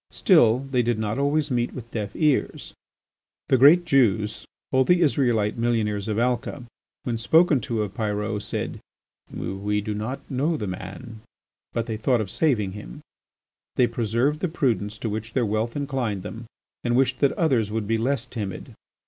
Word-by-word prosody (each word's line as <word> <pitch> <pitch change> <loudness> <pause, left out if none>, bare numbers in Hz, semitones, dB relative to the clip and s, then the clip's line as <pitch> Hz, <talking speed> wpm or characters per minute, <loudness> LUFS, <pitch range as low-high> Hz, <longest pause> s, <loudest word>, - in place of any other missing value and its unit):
Still, 120 +4 +4
they 125 -2 +3
did 120 -1 0
not 110 +3 -2
always 145 +1 +1
meet 120 -1 0
with 120 -2 -9
deaf 105 -3 -4
ears. 150 -4 0 0.8
The 130 - +5
great 160 +7 +7
Jews, 110 - +1 0.2
all 130 0 +4
the 180 +6 +3
Israelite 120 -8 +2
millionaires 110 -4 0
of 105 -1 -1
Alca, 125 +2 -1 0.4
when 115 -2 -2
spoken 160 +2 +4
to 110 -1 -1
of 100 -2 -6
Pyrot, 105 0 -2
said: - - -4 0.5
"We 100 +2 -2
do 105 +1 -3
not 110 +6 -4
know 145 +5 0
the 105 - -4
man"; 100 +5 -7 0.5
but 115 - -2
they 110 -1 -4
thought 120 +2 +2
of 105 -3 -3
saving 115 -12 +1
him. 65 -12 -9 0.7
They 125 - +4
preserved 120 +5 0
the 185 - 0
prudence 110 - -1
to 115 - -4
which 110 +1 -4
their 125 -3 +1
wealth 110 +2 -1
inclined 130 -9 -2
them 115 +3 -7 0.4
and 120 0 +1
wished 130 -1 +2
that 140 - +3
others 130 -10 +1
would 110 0 -2
be 115 +1 +1
less 130 +1 0
timid. 105 -6 -6
115 Hz, 170 wpm, -24 LUFS, 105-130 Hz, 0.8 s, great